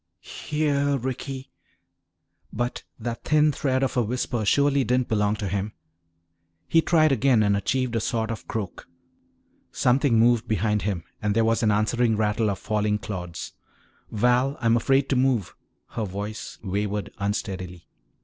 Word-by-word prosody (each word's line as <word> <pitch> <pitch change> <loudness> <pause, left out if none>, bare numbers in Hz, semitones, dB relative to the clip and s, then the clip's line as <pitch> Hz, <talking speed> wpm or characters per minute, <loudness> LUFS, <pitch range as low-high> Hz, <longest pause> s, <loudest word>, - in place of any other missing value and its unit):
"Here, 145 -2 +1
Ricky!" 130 +1 -5 1.0
But 120 +2 -3 0.2
that 115 0 -5
thin 150 0 +4
thread 135 -2 0
of 135 - -1
a 125 - +3
whisper 120 0 -2
surely 140 +4 +3
didn't 125 0 0
belong 105 -1 +1
to 105 -2 -4
him. 100 +2 -2 0.9
He 165 - +4
tried 155 -2 +3
again 130 -3 +3
and 100 -1 +3
achieved 120 +4 -1
a - - +2
sort 110 0 -1
of 115 - -7
croak. 105 -5 -5 0.8
Something 130 -1 +2
moved 115 0 +3
behind 105 0 +1
him 95 -5 -2 0.2
and 105 -1 0
there 115 0 +3
was 115 +1 +2
an 110 - +3
answering 110 +2 +2
rattle 105 0 +1
of 100 - -2
falling 105 -1 0
clods. 90 -5 -6 0.6
"Val, 125 +5 +2
I'm 115 -2 +3
afraid 135 +3 +2
to 135 - +2
move," 125 -8 +1 0.3
her 110 - -3
voice 100 +3 -6
wavered 100 +1 -2
unsteadily. 95 -4 -4
115 Hz, 150 wpm, -25 LUFS, 105-130 Hz, 1.0 s, thin